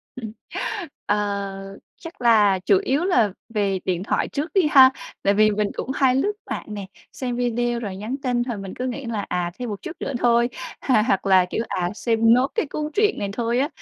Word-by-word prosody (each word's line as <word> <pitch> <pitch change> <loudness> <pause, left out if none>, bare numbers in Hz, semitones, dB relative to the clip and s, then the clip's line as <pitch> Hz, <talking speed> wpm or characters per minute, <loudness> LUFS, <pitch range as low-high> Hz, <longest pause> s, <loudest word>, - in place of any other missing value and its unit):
Ừm, 225 -4 -6 0.8
Ờ, 200 -1 -2 0.2
chắc 330 -4 -11
là 210 -5 +4
chủ 195 -2 +5
yếu 285 +7 +1
là 235 - +3 0.2
về 200 -2 +1
điện 180 -1 -1
thoại - - 0
trước 300 +4 -3
đi 370 -5 +4
ha. 260 -1 +8 0.3
Tại 200 +1 +3
vì 215 +1 +5
mình 210 0 0
cũng 265 - -4
hay 260 -2 +3
lướt 405 +11 +1 0.2
mạng - - -4
nè, 200 -2 -6 0.3
xem 245 -2 -4
video 240 0 0
rồi 200 -4 -5
nhắn 220 +7 -4
tin 245 -2 +1
thời 240 -4 -4
mình 195 -1 -7
cứ 255 - -4
nghĩ 255 +2 -4
là 215 -3 -3
"À, 175 -1 -1
thêm 245 -2 -4
một 205 -2 -6
chút 350 - -5
nữa 275 - -3
thôi" 235 0 +3 0.3
h 265 - 0
hoặc 195 -4 +1
là, 190 -2 +5
kiểu: 230 - -1
"À, 175 -1 -1
xem 230 0 +3
nốt 255 +2 +3
cái 445 -10 0
cuốn 300 +1 -4
truyện 420 +3 +2
này 200 - -2
thôi 235 +2 -1
á." 285 +3 +1
230 Hz, 215 wpm, -23 LUFS, 200-260 Hz, 0.8 s, ha